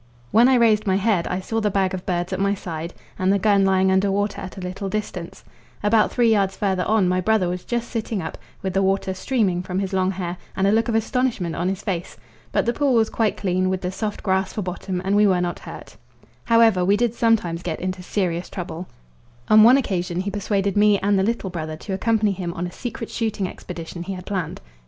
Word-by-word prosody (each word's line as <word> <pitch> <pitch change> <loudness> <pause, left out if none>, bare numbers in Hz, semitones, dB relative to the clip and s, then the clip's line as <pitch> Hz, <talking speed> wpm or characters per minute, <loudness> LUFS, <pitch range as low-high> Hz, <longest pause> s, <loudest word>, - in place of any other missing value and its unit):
When 235 +3 +6
I 265 - +5
raised 220 -3 +3
my 190 - +3
head 195 -3 +1
I 180 - -2
saw 225 +4 -2
the 210 - +1
bag 190 -1 0
of 185 -1 -6
birds 175 -1 -1
at - - -2
my 200 +1 +2
side, 170 -3 -6 0.2
and 185 +1 +2
the 200 - +3
gun 200 0 +3
lying 190 0 +3
under 190 +1 +3
water 205 +1 -1
at 190 +1 -8
a - - -5
little 185 +2 -5
distance; 190 -4 -5 0.4
about 210 +1 +3
three 235 -2 +3
yards 195 -3 +1
further 190 -3 0
on 215 -3 +3
my 185 0 +1
brother 215 -1 +2
was 180 0 -3
just 235 -1 -2
sitting 225 -2 -3
up, 160 - -5 0.3
with 190 -1 -2
the 195 - +2
water 190 0 +1
streaming 190 -4 0
from 180 0 -4
his 195 0 -2
long 185 0 +2
hair, 180 -2 -4 0.2
and 190 - +2
a 200 - +4
look 225 +1 +2
of 230 - 0
astonishment 225 -6 0
on 175 +2 -1
his 195 +1 -4
face. 180 -5 -4 0.3
But - - +1
the 235 - +1
pool 280 -2 +2
was 225 -1 +3
quite 220 -2 0
clean, 185 -1 0
with 185 0 -1
the 180 - -2
soft 210 +2 -4
grass 190 -1 +1
for 210 - -3
bottom, 180 0 -4
and 195 +1 +2
we 210 0 +5
were 185 -2 +3
not 175 -1 -2
hurt. - - -11 0.5
However, 230 -5 +4
we 200 +3 +3
did 235 0 +1
sometimes 215 -8 +1
get 165 -3 -4
into 185 0 -3
serious 180 -2 -2
trouble. 180 -1 -6 0.6
On 215 0 +8
one 240 +5 +8
occasion 180 -8 -1
he 200 +1 -3
persuaded 200 -1 -1
me 210 0 +5
and 200 0 +1
the - - +3
little 205 -2 -1
brother 155 -3 -5
to 195 +4 -6
accompany 215 +1 +1
him 180 -2 -4
on 175 0 -3
a 175 - -5
secret 230 0 -6
shooting 215 -4 -1
expedition 170 -1 -8
he 190 +3 -4
had 180 -1 -8
planned. 185 -6 -3
195 Hz, 235 wpm, -22 LUFS, 180-215 Hz, 0.6 s, On